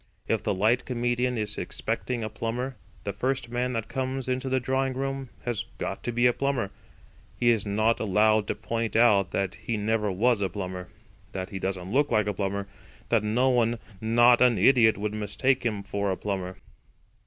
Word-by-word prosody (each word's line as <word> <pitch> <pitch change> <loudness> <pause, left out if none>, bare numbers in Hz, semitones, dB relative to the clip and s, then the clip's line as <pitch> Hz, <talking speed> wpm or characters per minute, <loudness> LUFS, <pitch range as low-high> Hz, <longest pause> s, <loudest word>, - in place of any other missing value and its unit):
If - - +1
the - - -1
light 110 +6 +2
comedian 120 0 0
is 105 -1 -1
expecting 120 -3 -3
a 110 - -3
plumber, 120 +4 -3 0.3
the 100 - -3
first 130 -1 -1
man 125 +1 -1
that 115 -2 -2
comes 130 0 -3
into 130 +1 -1
the 130 0 +2
drawing 130 +1 0
room 135 0 -3
has 120 -4 -2
got - - -4
to 120 - 0
be 120 +1 +2
a 120 - +5
plumber. 135 -7 -1 0.7
He 120 -1 +5
is 110 -3 0
not 110 +3 +2
allowed 110 0 +3
to - - -1
point 115 -1 -3
out 105 -5 +5
that 95 -1 -1
he 110 +2 -4
never 105 0 0
was 110 +3 +2
a 95 - +1
plumber; 90 -1 -5 0.4
that 95 -1 -4
he 95 - -5
doesn't 95 -1 -3
look 145 +4 +2
like 105 -1 +2
a 105 - -1
plumber; 100 0 -2 0.4
that 115 -3 +3
no 120 +5 +2
one 120 -1 +2 0.2
not 120 +2 +5
an 125 -3 +5
idiot 115 -6 +5
would 105 +1 -2
mistake 110 +6 0
him 105 -3 -3
for 100 0 -2
a 95 - -1
plumber. 95 -2 -4
115 Hz, 190 wpm, -27 LUFS, 100-125 Hz, 0.7 s, a